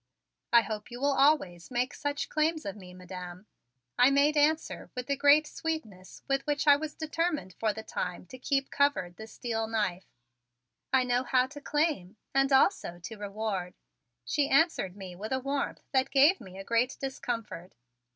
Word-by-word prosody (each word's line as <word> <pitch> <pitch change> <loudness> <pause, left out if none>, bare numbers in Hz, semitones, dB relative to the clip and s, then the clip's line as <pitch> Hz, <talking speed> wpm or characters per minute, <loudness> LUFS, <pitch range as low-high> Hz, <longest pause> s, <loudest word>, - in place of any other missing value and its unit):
"I 235 - +7
hope 215 -1 -5
you 240 0 -8
will 280 +1 +2
always 270 - +2
make 250 +2 -1
such 290 0 -3
claims 310 0 0
of 200 - -4
me, 185 -3 -12
Madam," 180 +1 -9 0.5
I 250 +2 +7
made 285 +2 +3
answer 305 +2 +1
with 250 -1 -4
the 280 - 0
great 290 +2 +5
sweetness 225 - -6
with 275 0 +1
which 290 0 0
I 290 -1 +8
was 310 +1 -5
determined 315 - -2
for 220 -1 +2
the 220 +1 -7
time 180 -4 -4
to 255 +8 -12
keep 275 +1 -1
covered 280 -12 +1
the 220 - -9
steel 225 -1 -3
knife. 200 -5 -2 0.8
"I 260 -1 +4
know 245 0 +1
how 255 0 +2
to 290 +2 -11
claim 285 - -1 0.2
and 270 +1 +3
also 265 - +3
to 200 +6 -8
reward," 205 -3 -4 0.5
she 280 - +1
answered 275 - +2
me 185 -3 -8
with 215 +6 -7
a 260 - +1
warmth 275 +2 -3
that 265 -1 +2
gave 290 +7 +5
me 185 0 -11
a 195 - -6
great 235 +5 +1
discomfort. 230 -9 -5
250 Hz, 175 wpm, -29 LUFS, 195-285 Hz, 0.8 s, I